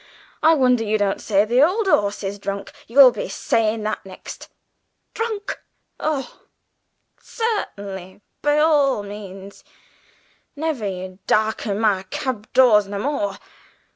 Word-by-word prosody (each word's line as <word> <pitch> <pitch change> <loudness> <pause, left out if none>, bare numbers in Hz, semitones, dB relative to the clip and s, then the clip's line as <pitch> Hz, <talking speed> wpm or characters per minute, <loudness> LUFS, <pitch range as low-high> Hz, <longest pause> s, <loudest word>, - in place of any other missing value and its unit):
I 320 +1 +6
wonder 250 -4 +3
yer 215 0 +1
don't 200 -2 0
say 205 -1 +2
the 240 +4 +3
old 385 +8 +3
'orse 205 - +2
is 200 +1 -4
drunk; 200 0 -5 0.2
you'll 260 +2 +8
be - - -5
sayin' 220 -1 0
that 215 0 -3
next! 190 -1 -10 0.6
Drunk! 440 -3 -3 0.4
oh, 285 -5 -3 0.8
cert'nly, 200 - -4 0.2
by 295 0 +2
all 290 -7 +3
means. 200 -1 -10 0.9
Never 290 -8 -2
you 185 0 -6
darken 215 -1 +1
my 210 -4 +2
cab 250 -5 -4
doors 215 -6 +5
no 200 0 -5
more. 205 -5 -2
215 Hz, 125 wpm, -22 LUFS, 200-280 Hz, 0.9 s, you'll